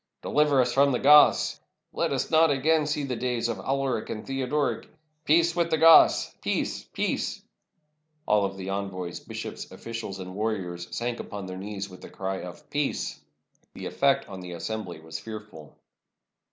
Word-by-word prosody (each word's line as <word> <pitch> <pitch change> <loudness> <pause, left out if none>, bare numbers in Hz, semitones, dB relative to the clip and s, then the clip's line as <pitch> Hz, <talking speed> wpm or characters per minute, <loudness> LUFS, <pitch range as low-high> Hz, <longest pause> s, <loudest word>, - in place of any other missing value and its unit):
"Deliver 150 -2 +3
us 125 -1 +2
from 140 +1 +4
the 125 - +1
Goths!" 150 +3 +6 0.3
"Let - - 0
us - - -1
not 160 0 +5
again 150 +2 +2
see 150 -1 -1
the 130 -3 -2
days 120 -1 -1
of 115 - -3
Alaric 135 -4 -1
and 110 - -5
Theod 135 -1 -3
oric!" 150 -1 0 0.4
"Peace 170 +2 +4
with 170 -1 +1
the 160 - +2
Goths! 165 +1 +7
Peace! - - -2
peace!" - - -1
And - - -27 0.8
all 105 -2 +3
the 95 0 -6
envoys, 95 -3 -4
bishops, - - -7
oflGicials, 115 -4 -6
and 95 -1 -7
warriors 95 -5 -3
sank 120 0 -3
upon 100 -2 -6
their 95 0 -6
knees 100 0 -5
with 90 -1 -13
the - - -10
cry 95 0 -4
of 90 -1 -10
"Peace!" 145 -1 -2 0.5
The - - -7
effect - - +2
upon 95 - -9
the 90 -1 -7
assembly 90 -1 -5
was 80 0 -7
fearful. 105 -6 -10
110 Hz, 170 wpm, -27 LUFS, 95-140 Hz, 0.8 s, Goths